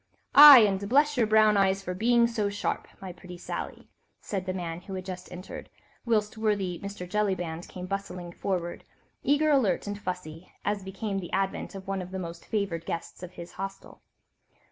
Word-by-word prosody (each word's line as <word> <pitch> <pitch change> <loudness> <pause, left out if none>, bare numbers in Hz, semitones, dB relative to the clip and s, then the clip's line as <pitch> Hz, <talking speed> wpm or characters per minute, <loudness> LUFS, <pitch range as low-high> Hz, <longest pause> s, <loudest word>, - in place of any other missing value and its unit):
"Aye, 290 -3 +12
and 200 -1 +1
bless 290 +4 +4
your 235 -4 +2
brown 215 -1 +5
eyes 195 0 +2
for 180 - -3
being 235 +5 +3
so 220 -3 -1
sharp, 200 - -3
my 190 -2 -7
pretty 180 0 -11
Sally," - - -6 0.3
said 190 -2 -4
the - - 0
man 175 -2 -5
who 190 +1 -7
had 185 -1 -6
just 185 -1 -7
entered, 180 +1 -9 0.4
whilst 220 -1 0
worthy 200 -5 0
Mr. 200 -2 -7
Jellyband 180 -4 -2
came 180 0 -8
bustling 185 -2 -5
forward, 175 -1 -3 0.4
eager, 295 +2 +2
alert 245 -11 +2
and 205 0 -5
fussy, 180 -3 -6
as 205 -1 0
became 195 +1 -4
the 175 - -8
advent 195 +1 -2
of 190 0 -9
one 195 -1 -2
of 180 - -8
the 190 - -5
most 170 -2 -7
favoured 195 -6 -2
guests 170 - -5
of 180 0 -9
his 170 -1 -9
hostel. 195 +1 -8
195 Hz, 185 wpm, -28 LUFS, 180-210 Hz, 0.4 s, Aye